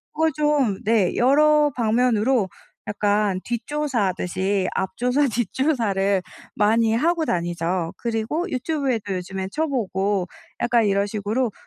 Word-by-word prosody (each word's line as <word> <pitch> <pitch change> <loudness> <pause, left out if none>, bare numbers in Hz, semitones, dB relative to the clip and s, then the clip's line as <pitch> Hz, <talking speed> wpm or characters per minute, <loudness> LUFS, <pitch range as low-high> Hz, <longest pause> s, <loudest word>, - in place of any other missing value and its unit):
그 320 +1 +2
좀 290 -9 +1
네 215 -5 +2
여러 295 +3 +4
방면으로 230 -2 +2 0.4
약간 205 -2 +1
뒷조사하듯이 205 - -1
앞조사, 250 +8 0
뒷조사를 220 -5 0 0.3
많이 220 +2 +2
하고 320 +7 +1
다니죠. 170 - -2
그리고 235 +9 -2
유튜브에도 255 - -1
요즘에 190 +1 -4
쳐보고, 205 - -1 0.3
약간 240 -2 +3
이런 200 0 +1
식으로 215 +4 -1
225 Hz, 270 characters per minute, -23 LUFS, 195-265 Hz, 0.4 s, 여러